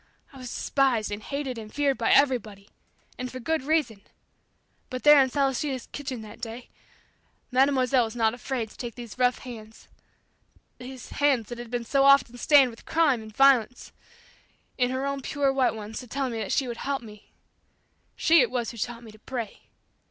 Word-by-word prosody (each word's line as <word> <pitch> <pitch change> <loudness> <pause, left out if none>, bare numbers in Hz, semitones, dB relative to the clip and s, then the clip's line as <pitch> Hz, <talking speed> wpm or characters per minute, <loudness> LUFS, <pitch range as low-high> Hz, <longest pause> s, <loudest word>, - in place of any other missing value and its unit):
I 270 - -12
was 250 -1 -7
despised 255 -6 0
and 205 +1 -4
hated 270 0 -4
and 215 -1 -10
feared 285 -2 0
by 230 - +1
everybody, 220 -8 +2 0.5
and 255 0 -4
for 255 - -7
good 320 +5 -1
reason. 270 -8 0 0.9
But 255 -1 -6
there 295 -1 +8
in 260 - -2
Celestina's 270 -1 -1
kitchen 265 -5 -6
that 215 +2 -12
day, 230 +1 -7 0.8
Mademoiselle 260 -1 +3
was 220 +1 -8
not 225 -2 +2
afraid 245 -3 -4
to - - -17
take 240 -2 -6
these 240 -1 -10
rough 250 0 +3
hands 225 -3 -11 0.9
these 255 0 -9
hands 270 -6 +1
that 240 -1 -7
had 240 -1 -8
been 240 0 -3
so 275 +3 +2
often 275 -3 +5
stained 275 -3 +5
with 230 - -15
crime 300 -8 +2
and 220 0 -11
violence 255 -3 +3 0.8
in 245 -1 +1
her 260 +1 -2
own 280 0 -2
pure 275 0 0
white 265 -3 +1
ones 215 0 -7
to 250 - -10
tell 270 +2 -2
me 220 -4 -4
she 265 - +1
would 235 -1 -5
help 275 0 -3
me! 210 -2 -14 0.8
She 330 -1 +5
it 245 - +2
was 240 -3 -2
who 235 - -12
taught 235 +2 -4
me 225 - -11
to 215 - -18
pray. 235 -3 -7
250 Hz, 185 wpm, -26 LUFS, 230-275 Hz, 0.9 s, there